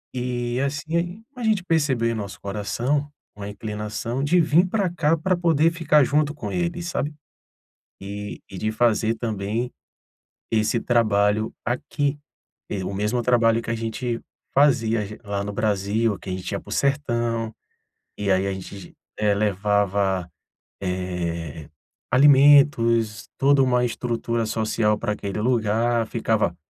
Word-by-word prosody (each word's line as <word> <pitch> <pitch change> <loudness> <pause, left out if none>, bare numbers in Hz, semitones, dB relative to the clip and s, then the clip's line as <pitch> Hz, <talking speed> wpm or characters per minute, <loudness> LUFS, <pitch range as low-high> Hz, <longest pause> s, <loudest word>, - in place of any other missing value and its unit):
E 125 0 -2
assim 165 +8 -2
a 250 - -8
gente 215 -4 +2
percebeu 145 -9 +1
em 115 - 0
nosso 100 -4 -6
coração 120 +8 -2 0.3
uma 100 0 -6
inclinação 105 +4 -4
de 170 +5 +3
vir 170 +2 +4
pra 200 -1 +1
cá 165 -2 +1
pra 185 +4 +1
poder 165 -2 +3
ficar 155 -3 +3
junto 150 +2 +1
com - - -5
ele, 175 -1 -2
sabe. 160 -3 -2 0.9
E 100 +1 -6
e 95 -2 -8
de 110 0 -1
fazer 115 0 +2
também 110 +1 -2 0.8
esse 110 +1 +2
trabalho 110 -2 +2
aqui, 140 +4 -1 0.7
o 100 - -4
mesmo 105 +5 0
trabalho 115 -1 +3
que 115 - -6
a 115 - +1
gente 115 +1 -3 0.3
fazia 115 -6 +3
j 105 +1 -9
lá 100 -2 -3
no 105 - -4
Brasil, 105 0 0
que 95 - -8
a - - -2
gente 90 0 -4
ía 100 - -2
para - - -14
o - - -6
sertão, 120 -5 0 0.6
e 100 -1 +1
aí 95 +1 +2
a 100 - -1
gente, 95 0 -9 0.2
eh 105 -1 +2
levava, 100 -2 +1 0.5
eh 85 -4 -4 0.4
alimentos, 130 -6 +5
toda 140 +1 +4
uma 125 -2 +3
estrutura 115 -1 -2
social 110 -1 +1
pra 110 -3 -1
aquele 100 0 -4
lugar, 115 0 +1
ficava 110 -5 0
115 Hz, 140 wpm, -23 LUFS, 105-140 Hz, 0.9 s, alimentos